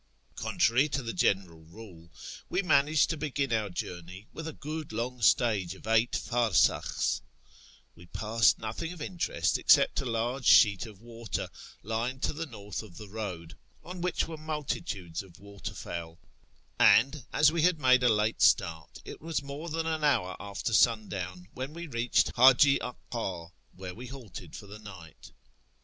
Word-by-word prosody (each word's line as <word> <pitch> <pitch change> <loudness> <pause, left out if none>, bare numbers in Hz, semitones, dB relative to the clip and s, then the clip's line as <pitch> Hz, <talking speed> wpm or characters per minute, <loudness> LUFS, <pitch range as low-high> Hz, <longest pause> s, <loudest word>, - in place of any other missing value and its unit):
Contrary 130 +6 +2
to 135 -2 -2
the 115 - -4
general 90 -3 0
rule, 85 0 -14 0.4
we 185 - 0
managed 150 -2 +3
to 160 - -3
begin 140 -4 -2
our 110 -2 0
journey 90 +2 -7
with 160 0 -6
a 160 - -5
good 155 +1 -6
long 120 +3 -4
stage 105 -6 +2
of - - -15
eight 115 +1 +2
farsakhs} 120 -6 +1 0.7
We 85 - -15
passed 110 +4 +2
nothing 115 +10 -5
of 180 - -12
interest 170 +3 -1
except - - +4
a - - -6
large 120 +2 -2
sheet 105 -1 +6
of 105 -2 -14
water, 115 -2 -5 0.3
lying 115 +4 -2
to - - 0
the 160 +2 -5
north 105 -5 -7
of 105 -6 -13
the 105 -2 -10
road, 90 -6 -6 0.3
on 180 0 -8
which 180 -1 0
were 160 -1 -7
multitudes 150 - -4
of 95 -4 -16
water 100 0 -8
fowl; 85 -1 -7 0.6
and, 135 +4 +5
as 150 +1 +5
we 165 0 0
had 180 +1 +3
made 130 -1 +5
a 125 - +4
late 110 0 +1
start, 80 -2 +2
it - - -9
was 160 -1 -3
more 140 +4 -7
than 165 +1 -2
an 160 -1 -2
hour 115 -11 +2
after 100 +2 -4
sundown 95 -6 +1
when 130 +3 -6
we 170 +1 -7
reached 120 -5 +1
Haji 135 +3 +6
Aka, 95 -9 -5 0.2
where 90 -1 -7
we 125 +6 -9
halted 125 -4 -10
for - - -9
the 100 +1 -11
night. 95 -7 -12
115 Hz, 165 wpm, -29 LUFS, 100-145 Hz, 0.7 s, sheet